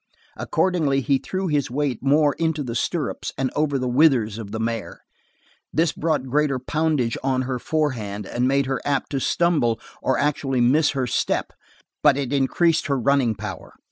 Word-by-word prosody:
Accordingly 155 Hz, -7 st, +1 dB
he 135 Hz, 0 st, +1 dB
threw 190 Hz, +6 st, -3 dB
his 145 Hz, -5 st, 0 dB
weight 135 Hz, -1 st, -1 dB
more 145 Hz, +2 st, +3 dB
into 160 Hz, -2 st, 0 dB
the 120 Hz, -3 st, -5 dB
stirrups 150 Hz, +5 st, -2 dB
and 130 Hz, -1 st, -1 dB
over 145 Hz, -2 st, +1 dB
the 130 Hz, -1 st, -2 dB
withers 125 Hz, -5 st, +3 dB
of 105 Hz, -3 st, -7 dB
the 110 Hz, -, -4 dB
mare. 115 Hz, -1 st, -4 dB, 0.7 s
This 165 Hz, 0 st, +2 dB
brought 155 Hz, -4 st, -1 dB
greater 140 Hz, +1 st, +1 dB
poundage 150 Hz, -3 st, -1 dB
on 130 Hz, -1 st, +1 dB
her 130 Hz, -1 st, -3 dB
forehand 120 Hz, -, -2 dB
and 120 Hz, +5 st, -1 dB
made 140 Hz, +1 st, +2 dB
her 130 Hz, -1 st, -2 dB
apt 140 Hz, -2 st, -1 dB
to 140 Hz, -, -1 dB
stumble 135 Hz, -8 st, +1 dB, 0.2 s
or 130 Hz, -, +1 dB
actually 140 Hz, -3 st, 0 dB
miss 140 Hz, +6 st, +4 dB
her 130 Hz, -, +1 dB
step, 125 Hz, -, -1 dB, 0.5 s
but 145 Hz, -2 st, +5 dB
it 140 Hz, -1 st, -2 dB
increased 155 Hz, +5 st, +2 dB
her 140 Hz, -2 st, +1 dB
running 130 Hz, -2 st, +2 dB
power. 100 Hz, -2 st, -7 dB
135 Hz, 170 wpm, -23 LUFS, 125-150 Hz, 0.7 s, but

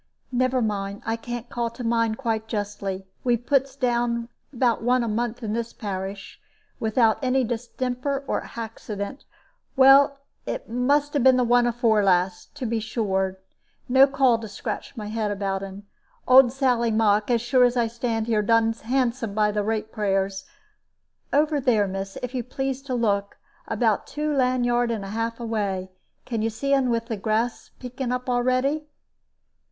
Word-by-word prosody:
Never 255 Hz, 0 st, +1 dB
mind; 200 Hz, -1 st, -3 dB
I 225 Hz, -, 0 dB
can't 240 Hz, +1 st, -6 dB
call 235 Hz, -1 st, -2 dB
to 240 Hz, +2 st, -9 dB
mind 230 Hz, -1 st, +1 dB
quite 225 Hz, -4 st, -2 dB
justly. 205 Hz, -3 st, -4 dB, 0.2 s
We 245 Hz, -1 st, +3 dB
puts 270 Hz, +2 st, 0 dB
down 240 Hz, -2 st, 0 dB, 0.2 s
about 245 Hz, -3 st, +1 dB
one 245 Hz, +1 st, +2 dB
a -, -, -2 dB
month 235 Hz, +2 st, -2 dB
in 215 Hz, -1 st, -2 dB
this 235 Hz, 0 st, -3 dB
parish, 195 Hz, -1 st, -6 dB, 0.4 s
without 220 Hz, 0 st, +2 dB
any 260 Hz, 0 st, +2 dB
distemper 250 Hz, +3 st, -3 dB
or -, -, 0 dB
haxident. 225 Hz, +1 st, -6 dB, 0.5 s
Well, 275 Hz, +1 st, +6 dB, 0.3 s
it -, -, -4 dB
must 285 Hz, +5 st, +1 dB
'a -, -, +3 dB
been 260 Hz, 0 st, +5 dB
the 250 Hz, -, +3 dB
one 240 Hz, 0 st, +4 dB
afore 230 Hz, -3 st, +2 dB
last 180 Hz, +1 st, +1 dB
to 280 Hz, -3 st, -5 dB
be 230 Hz, 0 st, 0 dB
sure, 190 Hz, -4 st, -1 dB, 0.5 s
no 265 Hz, +2 st, +6 dB
call 265 Hz, -4 st, +3 dB
to 225 Hz, -, -7 dB
scratch 205 Hz, +5 st, -6 dB
my 215 Hz, -, -5 dB
head 215 Hz, 0 st, -2 dB
about 195 Hz, -1 st, -2 dB
un. 195 Hz, +1 st, -8 dB, 0.4 s
Old 255 Hz, -1 st, +7 dB
Sally 250 Hz, -3 st, +1 dB
Mock, 215 Hz, -1 st, +2 dB
as 240 Hz, -1 st, +3 dB
sure 250 Hz, +1 st, +3 dB
as 245 Hz, 0 st, +3 dB
I 235 Hz, -, +3 dB
stand 230 Hz, -1 st, -2 dB
here 220 Hz, -2 st, +1 dB
done 225 Hz, +1 st, +3 dB
handsome 235 Hz, -2 st, -1 dB
by 210 Hz, -1 st, +3 dB
the 210 Hz, 0 st, 0 dB
rate 220 Hz, +1 st, -2 dB
payers. 195 Hz, -2 st, -1 dB, 0.9 s
Over 295 Hz, 0 st, +2 dB
there, 220 Hz, -5 st, +3 dB
miss, 195 Hz, 0 st, -5 dB
if 250 Hz, +1 st, -4 dB
you 255 Hz, -, -1 dB
please 270 Hz, +1 st, -3 dB
to 260 Hz, -2 st, -2 dB
look 200 Hz, -4 st, 0 dB, 0.3 s
about -, -, +1 dB
two 300 Hz, 0 st, -2 dB
land 255 Hz, -2 st, +2 dB
yard 240 Hz, 0 st, +2 dB
and 220 Hz, -4 st, -3 dB
a -, -, -7 dB
half 230 Hz, +2 st, -3 dB
away. 200 Hz, -5 st, -2 dB, 0.3 s
Can 230 Hz, -3 st, -2 dB
you 225 Hz, -, +1 dB
see 275 Hz, +6 st, -1 dB
un 270 Hz, -2 st, +3 dB
with 230 Hz, -1 st, 0 dB
the 230 Hz, -2 st, -4 dB
grass 220 Hz, +4 st, -1 dB
peeking 250 Hz, 0 st, -4 dB
up 250 Hz, 0 st, -3 dB
a'ready?" 255 Hz, +5 st, +1 dB
235 Hz, 170 wpm, -24 LUFS, 215-255 Hz, 0.9 s, Old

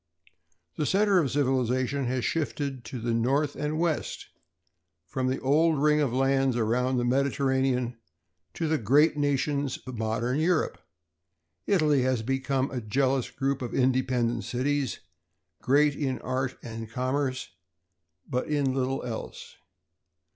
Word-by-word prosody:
The 150 Hz, -, 0 dB
center 200 Hz, -1 st, +4 dB
of 145 Hz, -6 st, +1 dB
civilization 130 Hz, 0 st, 0 dB
has 125 Hz, 0 st, -1 dB
shifted 140 Hz, -3 st, -2 dB
to 130 Hz, -, -6 dB
the 115 Hz, +1 st, -1 dB
north 135 Hz, +6 st, +1 dB
and 150 Hz, +2 st, -2 dB
west; 165 Hz, -2 st, -2 dB, 0.8 s
from 130 Hz, +8 st, -2 dB
the 130 Hz, +1 st, 0 dB
old 155 Hz, +3 st, +3 dB
ring 150 Hz, +1 st, +3 dB
of 140 Hz, -5 st, +1 dB
lands 135 Hz, 0 st, +2 dB
around 125 Hz, +3 st, +1 dB
the 120 Hz, -, +1 dB
Mediterranean 130 Hz, -2 st, +1 dB, 0.6 s
to 165 Hz, -, -1 dB
the 155 Hz, -1 st, +1 dB
great 145 Hz, +9 st, +4 dB
nations 145 Hz, -1 st, 0 dB
of 130 Hz, -3 st, -7 dB
modern 115 Hz, +5 st, -1 dB
Europe. 180 Hz, -, +1 dB, 0.9 s
Italy 155 Hz, -8 st, +3 dB
has 125 Hz, -3 st, 0 dB
become 135 Hz, +2 st, -1 dB
a 125 Hz, -2 st, -3 dB
jealous 130 Hz, +4 st, 0 dB
group 135 Hz, 0 st, -2 dB
of 120 Hz, -, -4 dB
independent 125 Hz, -3 st, +1 dB
cities, 135 Hz, +1 st, -1 dB, 0.6 s
great 145 Hz, +2 st, +4 dB
in 135 Hz, -3 st, -1 dB
art 130 Hz, 0 st, -2 dB
and 115 Hz, -1 st, -7 dB
commerce, 130 Hz, +2 st, -2 dB, 0.8 s
but 125 Hz, +1 st, -2 dB
in 145 Hz, -3 st, +1 dB
little 135 Hz, 0 st, -1 dB
else. 115 Hz, -2 st, -7 dB
130 Hz, 135 wpm, -27 LUFS, 125-145 Hz, 0.9 s, center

